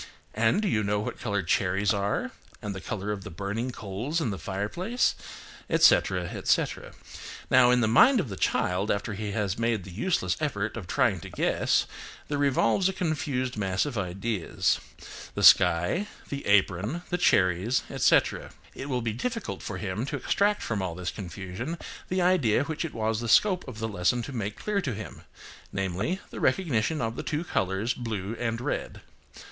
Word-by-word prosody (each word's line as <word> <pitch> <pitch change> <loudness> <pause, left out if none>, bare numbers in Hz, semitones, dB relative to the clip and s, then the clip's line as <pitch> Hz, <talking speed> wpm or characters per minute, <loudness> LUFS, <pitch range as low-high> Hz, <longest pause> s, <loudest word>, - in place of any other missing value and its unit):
And 115 - +2
do - - +1
you 105 - +1
know 105 +1 0
what 105 - -4
colour 100 -4 -1
cherries 95 +2 +1
are, 100 0 -1 0.3
and 105 - -4
the 95 - -7
colour 105 +1 -4
of 100 -2 -4
the - - -7
burning 100 +7 -3
coals 115 - -3
in 145 -9 -1
the 95 - -5
fireplace, 105 - -1 0.6
etc., - - +4
etc." - - -1 0.6
Now 130 -2 +7
in 125 0 +4
the 110 - +3
mind 235 - +6
of 170 - -1
the 100 - -6
child 95 +2 0
after 100 +1 -1
he 105 0 -4
has 105 -1 -1
made 115 -4 0
the 95 - -10
useless 95 - 0
effort 110 -9 -2
of 110 -6 -6
trying 120 -8 +2
to - - -9
guess - - +1 0.4
there 145 -1 -1
revolves 140 - +3
a - - -3
confused 145 -8 -2
mass 95 +1 0
of 145 -4 -4
ideas,–the 95 0 -3
sky, 90 - +5 0.2
the 140 0 -5
apron, 100 - +2
the 180 - 0
cherries, 95 - +3
etc. - - +2 0.2
It 140 - -7
will 125 -3 -1
be 115 -2 -1
difficult 230 - -4
for 100 - -5
him 100 +6 -3
to 145 - -3
extract 205 +10 +1
from 110 -4 -2
all 90 -3 -3
this 90 0 -3
confusion 100 - -6 0.3
the 185 0 +1
idea 145 - +3
which 160 +3 -3
it 165 - -5
was 110 0 0
the 115 -1 -4
scope 185 - +4
of 125 -4 -8
the 110 0 -2
lesson 105 +4 0
to 140 - -7
make 105 -3 -3
clear 210 -1 -1
to 130 - -3
him; 110 - -8 0.5
namely, 95 - -2
the - - -7
recognition 155 - +1
of 115 0 -2
the - - -4
two 150 +2 -2
colours, 95 - -1
blue 110 -3 -4
and 115 -1 -2
red. - - -3
110 Hz, 180 wpm, -27 LUFS, 100-140 Hz, 0.6 s, Now